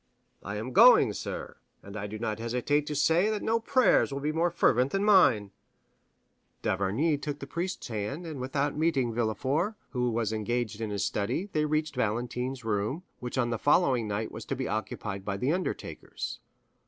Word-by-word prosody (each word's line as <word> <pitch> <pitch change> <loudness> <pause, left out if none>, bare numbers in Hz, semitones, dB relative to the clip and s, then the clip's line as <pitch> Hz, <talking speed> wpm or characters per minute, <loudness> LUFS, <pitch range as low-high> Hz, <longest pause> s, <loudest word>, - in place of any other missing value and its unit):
"I 100 - -5
am 115 +5 -5
going, - - +7
sir; - - -6 0.3
and 100 +1 -10
I 105 0 -4
do 110 +1 -6
not 110 -1 -3
hesitate 125 +6 0
to 150 - -3
say 165 +7 +3
that 215 -1 -2
no 225 +1 +2
prayers 255 - +3
will 140 - -3
be 150 +2 -1
more 165 +3 +1
fervent 125 -4 +2
than 195 +1 +1
mine." 120 - +5 1.1
D'Avrigny 110 - +1
took 145 -1 -4
the 140 - -7
priest's 170 +3 -4
hand, 115 - -4
and 155 -4 -6
without 140 +2 -1
meeting 145 -7 +1
Villefort, 130 - 0 0.2
who 125 -2 0
was 115 -2 -1
engaged 110 0 -2
in 110 - -2
his 100 -1 -1
study, 135 - -2
they 150 0 +2
reached 155 0 -1
Valentine's 125 +2 -2
room, 110 - -1 0.2
which 125 +1 -5
on 120 -2 +1
the 115 - -2
following 135 -7 +3
night 105 +2 -3
was - - -7
to - - -2
be - - -3
occupied 105 -1 -4
by 100 0 -3
the 130 +9 +1
undertakers. 185 +1 -4
125 Hz, 180 wpm, -29 LUFS, 110-155 Hz, 1.1 s, going